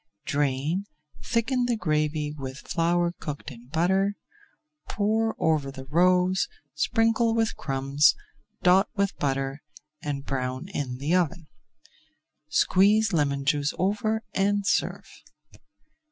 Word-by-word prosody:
Drain, 145 +6 0 0.4
thicken 245 +2 0
the 240 - +1
gravy 155 -4 0
with 135 -2 -6
flour 175 0 +1
cooked 150 0 -6
in 120 -1 -13
butter, 190 +7 +1 0.7
pour 220 +2 0
over 155 -4 +1
the 135 -1 -9
roes, 180 - +3 0.3
sprinkle 225 0 +2
with 225 -1 +1
crumbs, 135 0 +2 0.5
dot 185 +3 +5
with 200 -1 0
butter, 135 0 -2 0.4
and 140 -2 -4
brown 130 +4 -3
in 135 -9 -4
the 145 +6 -1
oven. 175 -2 +1 1.0
Squeeze 210 +3 +3
lemon 140 -3 +1
juice 145 0 +1
over 215 +3 0
and 200 +1 +1
serve. - - 0
165 Hz, 110 wpm, -26 LUFS, 140-200 Hz, 1.0 s, dot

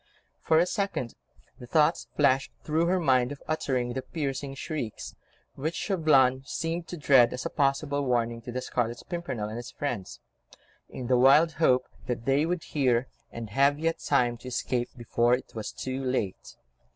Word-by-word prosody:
For 160 - +3
a 170 - +5
second, 195 - -2 0.5
the 125 - -10
thought 155 +4 +2
flashed 135 -2 +2
through 160 +2 +1
her 185 +1 +2
mind 130 -5 +3
of 145 - -7
uttering 130 -6 -1
the 130 - -3
piercing 140 -2 -4
shrieks, 135 -6 -5 0.4
which 155 +5 -3
Chauvelin 135 -9 +3
seemed 165 +4 -3
to 175 - -6
dread, 135 -5 +5
as 125 - -5
a - - -2
possible 140 +1 +1
warning 120 -2 0
to 120 - -7
the 130 +1 -3
Scarlet 120 -1 -2
Pimpernel 140 - -3
and 110 - -6
his 120 - -7
friends—in 125 +1 -8
the 125 0 +3
wild 145 +6 +6
hope 130 -4 +4 0.2
that 120 -2 -3
they 140 +3 +2
would 175 -1 -2
hear, 130 -4 +1 0.2
and 115 -2 -7
have 140 +4 +3
yet 165 +1 -1
time 120 -4 +1
to 130 - -12
escape 125 -1 -1
before 120 0 +2
it 130 - -10
was 110 -2 -5
too 130 +1 -4
late. 125 -7 -3
135 Hz, 170 wpm, -28 LUFS, 120-155 Hz, 0.5 s, wild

